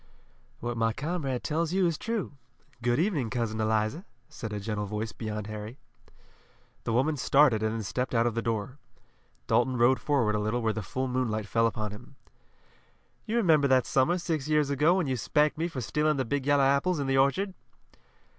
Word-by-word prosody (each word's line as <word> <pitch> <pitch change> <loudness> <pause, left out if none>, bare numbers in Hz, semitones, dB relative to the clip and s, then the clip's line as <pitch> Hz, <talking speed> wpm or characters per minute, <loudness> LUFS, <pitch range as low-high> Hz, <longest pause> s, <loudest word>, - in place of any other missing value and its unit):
"What 120 0 -3
my 115 0 +1
comrade 140 -3 -3
tells 165 +2 -1
you 190 -1 +3
is 170 -2 +1
true. 225 -3 -3 0.5
Good 120 0 +1
evening, 155 - 0
Cousin 110 -3 -2
Eliza!" 110 - 0 0.3
said 115 -4 -7
a 105 - -3
gentle 105 0 -3
voice 110 +2 -3
beyond 105 -1 -5
Harry. 110 +3 -7 1.1
The - - -1
woman 140 +6 +1
started 135 -5 +4
and 110 0 0
then 110 0 -3
stepped 125 +5 -2
out 115 0 +3
of 120 - +1
the 115 - -1
door. 115 +4 -3 0.7
Dalton 125 - +2
rode 120 +2 +4
forward 125 -8 +1
a 105 - 0
little 110 +3 -1
where 110 -1 +1
the 110 - -3
full 130 +7 -3
moonlight 120 -4 -1
fell 115 +2 +2
upon 110 -2 -3
him. 125 +6 -12 1.1
"You 225 - 0
remember 160 -10 +4
that 130 -2 +3
summer 140 +7 +2
six 160 -5 -2
years 150 -2 +2
ago 150 +6 +3
when 185 -3 +1
you 130 -2 -1
spanked 150 +6 +1
me 165 - 0
for 140 -7 -5
stealing 150 +7 0
the 130 - 0
big 140 +3 -2
yellow 145 -1 +4
apples 140 +6 +2
in 140 - -2
the 135 0 +2
orchard." 185 +9 +1
130 Hz, 195 wpm, -28 LUFS, 110-150 Hz, 1.1 s, started